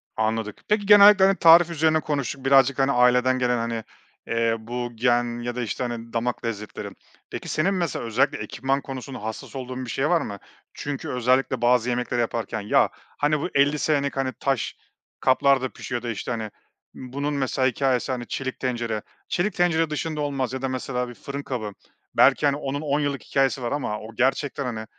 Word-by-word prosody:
Anladık. 110 -1 -2
Peki, 210 -1 +1
genellikle, 205 -1 +8
hani, 195 0 +4
tarif 170 0 +7
üzerine 160 -1 +2
konuştuk 140 -3 -3
birazcık, 135 0 +4
hani, 135 +1 +3
aileden 125 0 +3
gelen, 125 -1 +1
hani, 115 -1 -3 0.4
eee, 115 0 +1
bu 120 +2 -5
gen 120 0 +1
ya 120 0 -3
da, 125 - -2
işte, 115 +2 -3
hani, 115 -1 -5
damak 120 +1 -2
lezzetleri. 105 -2 -5 0.4
Peki, - - -6
senin 175 +6 +1
mesela 170 -10 -2
özellikle 115 +3 +1
ekipman 135 +1 -2
konusunda, 130 -3 -7
hassas 110 +5 -6
olduğun 130 -1 -5
bir - - -8
şey 135 +5 0
var 175 -2 +3
mı? 100 -6 -6 0.3
Çünkü 145 -1 -5
özellikle 125 0 +1
bazı 125 0 +3
yemekleri 120 0 -1
yaparken 115 -1 -2
ya, 100 - +3
hani, 150 +1 -2
bu 170 - -3
50 140 +2 +3
senelik, 140 -3 0
hani, 130 -1 -1
taş 135 -4 -1 0.4
kaplarda 130 0 +3
pişiyor 120 -1 -5
da, 120 - -4
işte, 115 +1 -4
hani, 110 -3 -4 0.4
bunun 140 +3 -4
mesela 130 -1 +1
hikâyesi, 130 -1 0
hani, 120 -2 -4
çelik 130 -1 -4
tencere. 120 -4 -2 0.3
Çelik 195 +3 0
tencere 165 -2 +2
dışında 150 0 -3
olmaz 135 -3 -2
ya 130 - -4
da 135 - -1
mesela 125 -1 -3
bir - - -8
fırın 140 +3 -7
kabı 110 -7 -4 0.4
belki, - - +5
hani, 140 -1 +3
onun 140 0 -3
10 145 -1 0
yıllık 145 -2 -2
hikâyesi 135 -1 +1
var 120 - -2
ama 125 -7 -2
o 110 +1 -11
gerçekten, 135 +3 0
hani, 110 -3 -4
130 Hz, 185 wpm, -24 LUFS, 120-145 Hz, 0.4 s, genellikle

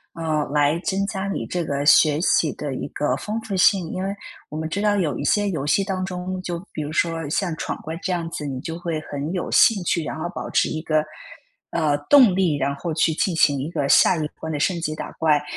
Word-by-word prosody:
呃， 160 -2 -1
来 145 +2 +2
增 195 +2 -1
加 195 -1 -3
你 195 - -3
这 175 -1 -2
个 140 -2 -2
学 150 0 +5
习 165 -2 +2
的 145 -2 -5
一 130 - -4
个 150 - 0
丰 215 +2 -4
富 220 -3 -5
性。 185 -2 +3
因 185 - -3
为 195 - -1 0.4
我 150 - -6
们 160 0 -3
知 200 +5 -3
道 210 -1 +2
有 175 -7 0
一 - - -3
些 205 -1 +2
游 150 -6 -3
戏 195 +6 +3
当 190 -1 -2
中， 185 0 -4
就 175 -2 -4 0.2
比 - - -4
如 150 0 -4
说 165 -2 -1
像 170 +1 -1
闯 - - -3
关 160 +1 -5
这 190 - -2
样 170 -2 -1
子， 150 - -5
你 130 -2 -4
就 165 +5 -6
会 170 -3 -3
很 145 +1 -5
有 180 - -3
兴 205 -5 +5
趣， 170 -1 0
然 155 - -5
后 165 - -2
保 - - -5
持 - - +2
一 155 - -3
个， 155 -1 +1 0.7
呃， 155 -3 +1
动 255 -9 +7
力， 180 -5 +2
然 140 0 0
后 165 +3 -4
去 160 +1 +2
进 170 +3 0
行 145 -3 +3
一 140 +4 -3
个 150 -5 -1
下 - - +6
一 155 -2 -2
波 160 - -5
的 150 -2 -2
升 170 +3 +1
级 155 -2 -3
打 - - -6
怪。 150 -2 +2
165 Hz, 265 characters per minute, -23 LUFS, 150-185 Hz, 0.7 s, 动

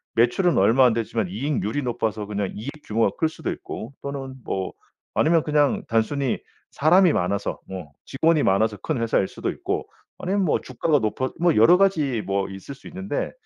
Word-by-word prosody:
매출은 120 +10 +3
얼마 130 +3 +5
안 120 - +4
되지만 115 -2 -1
이익률이 130 +4 -2
높아서 110 -3 -2
그냥 100 -2 -3
이익 110 +6 -5 0.2
규모가 110 -1 +1
클 160 - +2
수도 - - -4
있고 120 +5 -7
또는 140 -1 -5
뭐 95 -1 -3 0.4
아니면 165 0 +3
그냥 150 -2 +2
단순히 120 +4 0 0.3
사람이 175 +3 +5
많아서 100 +3 -1
뭐 90 -6 -7
직원이 160 +3 +2
많아서 105 +2 +2
큰 115 - -2
회사일 110 -4 +1
수도 - - -4
있고 - - -3 0.3
아니면 195 +2 0
뭐 155 - +2
주가가 145 +4 +1
높아 120 +4 -1
뭐 170 -1 +3
여러 115 +12 +7
가지 155 - +2
뭐 100 0 -1
있을 95 +8 -8
수 - - -14
있는데 190 +3 -3
125 Hz, 360 characters per minute, -24 LUFS, 105-155 Hz, 0.4 s, 여러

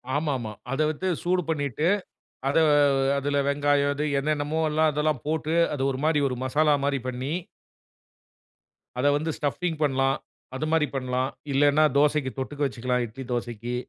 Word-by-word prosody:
ஆமா, 150 0 0
ஆமா 110 -3 -5 0.2
அத 135 - -2
வச்சு 155 +5 -3
சூடு 180 +1 +1
பண்ணிட்டு, 150 0 -1 0.6
அத 140 - +1 0.6
அதுல 145 +1 -1
வெங்காயம், 145 0 +2
இது 150 +2 -1
என்னென்னமோல்லாம் 155 +2 +1
அதெல்லாம் 150 -3 0
போட்டு 160 +1 -1 0.2
அது 135 - -2
1 130 - -4
மாரி 155 -1 +3
1 125 - -3
மசாலா 150 +3 +3
மாரி 140 -1 0
பண்ணி 130 +3 -3 1.7
அத 130 - 0
வந்து 160 +2 -2
ஸ்டப்பிங் 160 +2 -2
பண்லாம். 135 -1 +2 0.4
அது 150 - -2
மாரி 160 -2 +3
பண்லாம். 130 0 -1 0.2
இல்லன்னா 145 +2 +4
தோசைக்கு 145 -2 +2
தொட்டுக்க 145 +2 -5
வச்சுக்கலாம். 125 -1 -1
இட்லி 130 +4 -9
தோசைக்கி. 120 0 -3
145 Hz, 145 wpm, -26 LUFS, 130-155 Hz, 1.7 s, இல்லன்னா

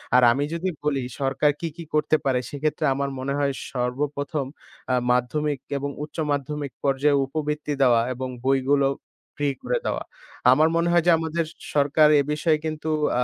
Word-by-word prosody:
আর 125 - +6
আমি 135 +4 0
যদি 170 +3 -1
বলি 145 -2 0 0.2
সরকার 135 +2 +2
কী, 170 - -2
কী 170 - -6
করতে 155 0 +3
পারে? 130 -2 +2
সেক্ষেত্রে 155 +2 -1
আমার 140 +1 -2
মনে 135 +1 -2
হয় 140 -1 +1 0.2
সর্বপ্রথম 140 +4 -2 0.5
আ - - +4 0.2
মাধ্যমিক 140 +4 0 0.2
এবং 140 +1 -3
উচ্চ 150 - -10
মাধ্যমিক 145 0 -2
পর্যায়ে 140 +1 +3
উপবৃত্তি 150 +1 -3
দেওয়া 120 -3 +5
এবং 130 +1 -4 0.2
বইগুলো 135 +1 +3 0.5
ফ্রি 145 -1 0
করে - - 0
দেওয়া। - - -1 0.5
আমার 155 +1 +5
মনে 170 +1 +2
হয় 175 -1 +4
যে, 175 - +7
আমাদের 165 +1 -1 0.3
সরকার 145 +2 +5
এ - - +5
বিষয়ে 155 +1 +2
কিন্তু 155 0 -3 0.3
আ - - +3
145 Hz, 170 wpm, -24 LUFS, 135-155 Hz, 0.5 s, যে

